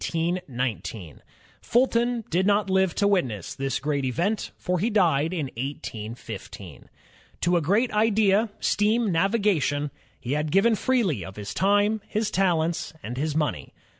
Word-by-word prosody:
Fulton 240 -1 +1
did 185 +4 +2
not 205 -1 +2
live 190 -2 +2
to 200 - +2
witness 130 - -1
j 135 - -7
this 135 - 0
great 145 -2 -1
event, 175 - -1
for 180 -1 -1
he 215 +7 +1
died 165 -8 +2
in 155 -7 -3
181 115 -4 -5
5. - - -8 0.9
To 175 +1 +2
a 170 - +3
great 205 - +2
idea, 215 0 +3
— - - -33
steam 215 +1 +2
navigation, 170 -6 +1
— - - -35
he 125 - -5
had 150 +1 0
given 200 +5 +4
freely 210 - +1
of 95 +2 -9
his 105 -1 -6
time, 205 +2 +2
his 215 0 -1
talents, 170 -4 0
and 120 - -5
his 150 +2 -1
money. 150 -6 -2
185 Hz, 155 wpm, -25 LUFS, 145-210 Hz, 0.9 s, given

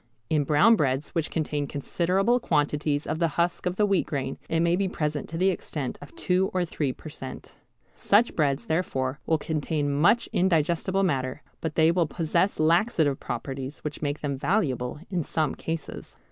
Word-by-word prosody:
In 150 -2 +2
brown 180 +11 +5
breads 135 -4 0
which 165 -2 -2
contain 150 -3 -2
considerable 185 - +1
quantities 150 -4 0
of 155 +1 -2
the 170 - +3
husk 175 +1 0
of 180 - -1
the 210 - +3
wheat 200 -3 +1
grain 135 -2 -3
it 165 - +1
may 170 +1 +3
be 195 +1 0
present 150 -5 -2
to 165 - -4
the 190 +2 +3
extent 145 -7 -5
of 145 - -12
two 185 +1 +1
or 180 -1 +2
three 150 -5 -2
per 140 - -11
cent. 135 -3 -8 0.4
Such 215 +4 +3
breads 140 -3 +1
therefore 145 -5 -1
will 160 - +3
contain 150 -1 -1
much 170 +11 +3
indigestible 175 +2 +2
matter, 130 -7 -1 0.2
but 160 -2 -4
they 160 0 +5
will 170 -2 +2
possess 170 +5 0
laxative 160 - +3
properties 135 +3 -5
which 150 -1 -5
make 145 0 -2
them 140 -2 -2
valuable 135 - 0
in 180 -3 0
some 155 -1 -1
cases. 165 0 -6
155 Hz, 175 wpm, -26 LUFS, 145-175 Hz, 0.4 s, brown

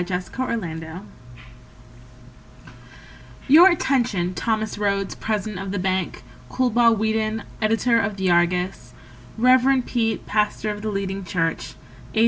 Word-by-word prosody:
Kinsey 180 0 -4
Keene 180 -8 -4 2.4
Your 330 +7 +8
attention, 240 - 0
Thomas 220 0 -2
Rhodes, 200 -1 -1
president 210 -2 -3
of 195 - -5
the 200 - -2
bank; 185 0 -2 0.3
Coolbaugh 240 -2 +3
Whedon, 220 +1 -1 0.2
editor 225 +2 +2
of 205 -2 -2
the 190 -2 +1
Argus; 180 +2 0 0.4
Rev. 255 +2 +4
Peet, 225 -3 -1
pastor 210 0 0
of 205 0 -7
the 215 - -3
leading 195 -1 -3
church; 165 -2 -2 0.4
A. - - +2
210 Hz, 115 wpm, -22 LUFS, 190-230 Hz, 2.4 s, Your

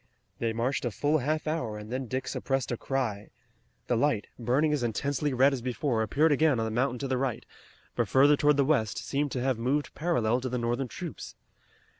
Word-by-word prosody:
They 115 -1 0
marched 120 +4 -1
a 120 - 0
full 145 +8 +1
half 155 +4 -1
hour 155 -9 -2
and 105 +1 -9
then 130 0 -3
Dick 130 +3 -3
suppressed 135 -2 -2
a - - 0
cry. 115 -5 -3 0.6
The 120 - +1
light, 115 -3 +1
burning 135 +6 +2
as 145 - 0
intensely 140 +5 -1
red 135 +2 +4
as 130 - -3
before, 125 -1 -1
appeared 145 +9 +2
again 145 -1 +3
on 115 - 0
the 110 - -3
mountain 125 +3 0
to 135 - -2
the 130 -1 0
right, 130 -4 -2 0.5
but - - +1
further 140 +2 +5
toward 145 0 +3
the 140 - +3
west, 130 -8 +1
seeming 145 +1 -1
to 130 - -3
have 130 -3 0
moved 140 +5 0
parallel 125 -8 +1
to 130 - -3
the 125 - -2
Northern 120 +2 -1
troops. 170 +5 -7
130 Hz, 210 wpm, -28 LUFS, 120-145 Hz, 0.6 s, further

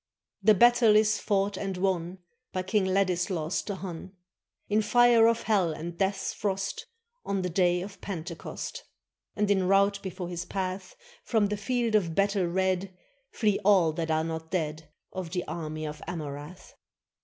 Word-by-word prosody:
] - - -64
The 215 +2 +6
battle 240 0 +6
is 215 0 +4
fought 200 -1 0
and 195 -2 -3
won 180 -1 -1 0.4
By 185 -1 -1
King 190 +1 +1
Ladislaus 180 -3 0
the 200 - -5
Hun, 185 -1 -7 0.5
In 210 +1 +2
fire 240 0 +5
of 230 0 +1
hell 190 -7 +2
and 165 +3 -6
death's 195 +2 -1
frost, 195 -2 -3 0.4
On 195 -2 -2
the 180 - -2
day 180 0 +2
of 195 -1 -10
Pentecost. 175 - -6 0.5
And 210 -1 +1
in 190 -2 +2
rout 200 +1 +3
before 180 -2 -5
his 175 -1 -4
path 190 - -4 0.3
From 215 -4 +1
the 210 - -1
field 235 +2 -1
of 175 -7 +2
battle 200 -2 +2
red 185 +1 -1 0.3
Flee 210 -3 +1
all 190 -5 +5
that 165 0 -3
are 160 0 +2
not 160 0 -5
dead 155 -3 -3 0.2
Of 185 -3 -5
the 180 - -1
army 155 -2 -4
of 150 0 -6
Amurath. 150 0 -7
190 Hz, 165 wpm, -28 LUFS, 170-205 Hz, 0.5 s, The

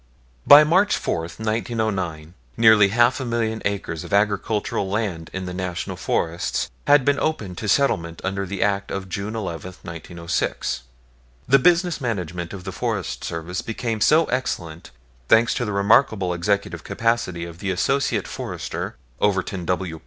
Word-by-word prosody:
By 145 +1 +10
March 185 +7 +3
4, - - -1
1909, 100 -5 -3 0.2
nearly 110 -3 +7
half 120 +5 +3
a - - -3
million 115 -2 -1
acres 100 -5 -2
of - - -10
agricultural 100 -1 0
land 95 -6 -2
in 95 0 -4
the 90 - -5
National 90 -1 -4
Forests 85 +1 -1 0.2
had 145 -2 +5
been 140 0 +2
opened 105 - -2
to 105 - -3
settlement 85 -10 +1
under 95 0 -2
the 95 0 -1
Act 100 -1 0
of 95 -1 -4
June 100 +4 -4
11, 90 -3 -5
1906. 85 -6 -3 0.7
The 135 +1 +6
business 175 +1 +3
management 90 - -3
of 95 -2 -8
the 95 - -5
Forest - - -3
Service 85 +2 -4
became 115 -1 -3
so 155 +7 +5
excellent, 85 - -3 0.4
thanks 115 +2 +5
to 120 - -1
the 105 - -3
remarkable 100 -2 +3
executive 100 +4 -1
capacity 115 -7 -1
of 85 0 -10
the 100 - -3
Associate 135 +9 0
Forester, - - -5 0.2
Overton 95 -2 0
W. 90 -3 -2
100 Hz, 150 wpm, -23 LUFS, 90-115 Hz, 0.7 s, By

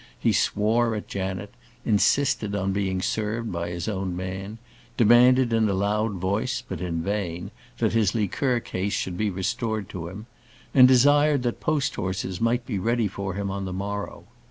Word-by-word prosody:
He - - +2
swore 110 +2 +2
at 105 - -5
Janet; 95 +1 -4 0.3
insisted 110 0 +2
on 95 -1 -1
being 95 -2 -1
served 110 +1 -2
by 85 -1 -3
his 85 -1 -4
own 95 -4 -2
man; 95 +3 -5 0.4
demanded 120 +2 +5
in 110 -2 +3
a 100 - 0
loud 105 +2 0
voice, 100 +7 -1
but 95 -3 -5
in 85 -2 -2
vain, 95 -4 -3 0.3
that - - +1
his 110 -3 +2
liqueur 120 +4 0
case 100 0 -3
should 90 - -2
be 105 +3 0
restored 110 +2 -2
to 85 -3 -6
him; 100 +5 -8 0.5
and 130 -2 +8
desired 145 +2 +4
that 120 -1 -2
post 150 -2 0
horses 95 0 -3
might 120 +1 +1
be 105 -6 -2
ready 115 +2 +1
for 100 -1 -5
him 100 -1 -2
on 100 0 -4
the 95 - -4
morrow. 100 +2 -4
100 Hz, 175 wpm, -25 LUFS, 95-115 Hz, 0.5 s, and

